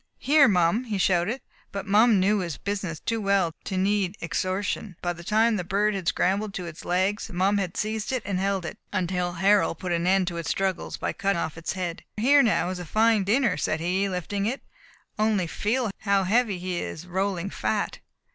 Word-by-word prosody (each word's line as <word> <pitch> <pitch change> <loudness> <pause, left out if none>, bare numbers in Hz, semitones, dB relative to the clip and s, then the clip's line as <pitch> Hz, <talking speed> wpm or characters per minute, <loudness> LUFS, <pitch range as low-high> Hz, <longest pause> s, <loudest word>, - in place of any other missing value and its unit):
"Here, 285 0 +5
Mum!" 180 +4 +2
he 215 -4 -2
shouted; 190 +6 +1 0.3
but 200 -1 -5
Mum 210 +1 +5
knew 200 +3 +3
his 170 -5 -3
business 195 -5 -3
too 230 -1 -2
well 195 -4 +2
to 190 - -3
need 200 0 +1
exhortation, 185 +4 -2
for - - -40
by 175 0 0
the 170 0 -11
time 220 +4 +2
the 180 - -2
bird 205 +4 +1
had 190 -4 -4
scrambled 195 +4 0
to 180 - -4
its 170 -2 -9
legs 190 +5 0
Mum 195 +3 +2
had 185 -3 -3
seized 215 +1 -2
and 205 -7 -2
held 195 -2 0
it, 160 - -7
until 180 -2 -1
Harold 190 -1 +3
put 180 +1 -4
an 170 0 0
end 190 0 +3
to 170 - -6
its 165 -1 -4
struggles 190 -2 -1
by - - -2
cutting 195 -2 0
off 160 - -3
its 165 0 -4
head. 175 -2 -4
"Here 280 +6 +5
now 215 -8 +2
is 185 - -5
a 180 - -6
fine 220 +3 +3
dinner," 225 -1 +2
said 155 +1 -1
he, 185 +4 0
lifting 195 +2 -2
it, 255 +5 -3 0.6
"only 215 -4 +2
feel 220 +6 -1
how 200 -2 +2
heavy; 210 +1 +2
he 180 0 -3
is 160 - -6
rolling 190 0 -2
fat." - - -2
195 Hz, 205 wpm, -26 LUFS, 180-210 Hz, 0.6 s, Here